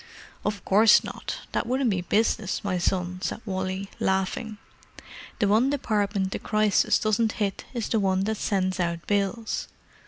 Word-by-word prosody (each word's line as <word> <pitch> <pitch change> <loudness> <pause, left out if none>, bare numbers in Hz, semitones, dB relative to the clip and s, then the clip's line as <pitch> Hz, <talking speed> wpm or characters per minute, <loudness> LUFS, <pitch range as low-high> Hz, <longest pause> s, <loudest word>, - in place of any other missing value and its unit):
"Of 205 -1 -3
course 210 +3 +6
not—that - - -5
wouldn't 255 -1 +1
be 185 -2 0
business, 215 +4 0
my 185 -3 -1
son," 180 0 -1
said - - -3
Wally, 190 -1 -3
laughing. 190 +3 -1 0.8
"The 205 - +2
one 220 +6 +4
department 205 -8 0
the - - -3
Crisis 215 -2 +2
doesn't 215 +1 +1
hit 200 -3 -2
is 235 -3 -2
the 225 - +1
one 190 -1 +1
that 220 +1 -1
sends 185 -2 0
out 170 -1 -1
bills." 205 +2 -1
200 Hz, 150 wpm, -26 LUFS, 190-220 Hz, 0.8 s, course